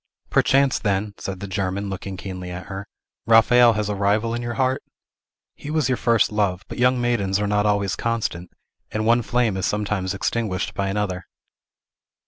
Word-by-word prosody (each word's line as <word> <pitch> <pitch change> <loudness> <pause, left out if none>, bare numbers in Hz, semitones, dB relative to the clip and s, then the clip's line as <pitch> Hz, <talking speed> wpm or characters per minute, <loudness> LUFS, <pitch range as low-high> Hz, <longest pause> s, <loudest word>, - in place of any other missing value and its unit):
"Perchance, 135 -1 +3
then," 100 0 -1
said 95 -1 -5
the 100 - -4
German, 95 +1 -2
looking 95 0 -5
keenly 90 -1 -6
at 90 +1 -6
her, 95 +1 -7 0.4
"Raphael 115 +1 +6
has 105 -1 -1
a 105 - -1
rival 105 +3 +1
in 120 - -2
your 120 -1 -4
heart? 130 +2 +1 0.7
He 145 - -9
was 155 -4 +1
your 130 - +2
first 115 -3 +2
love; 100 -3 0
but - - -8
young 125 +1 +3
maidens 105 -5 +1
are 105 - 0
not 105 0 +1
always 100 -2 +1
constant, 110 -7 -2 0.4
and 110 0 -2
one 120 +2 +4
flame 120 -3 0
is 95 - 0
sometimes 105 -2 -1
extinguished 95 -2 -2
by 100 -1 -1
another!" 95 -3 -2
105 Hz, 175 wpm, -23 LUFS, 95-115 Hz, 0.7 s, Raphael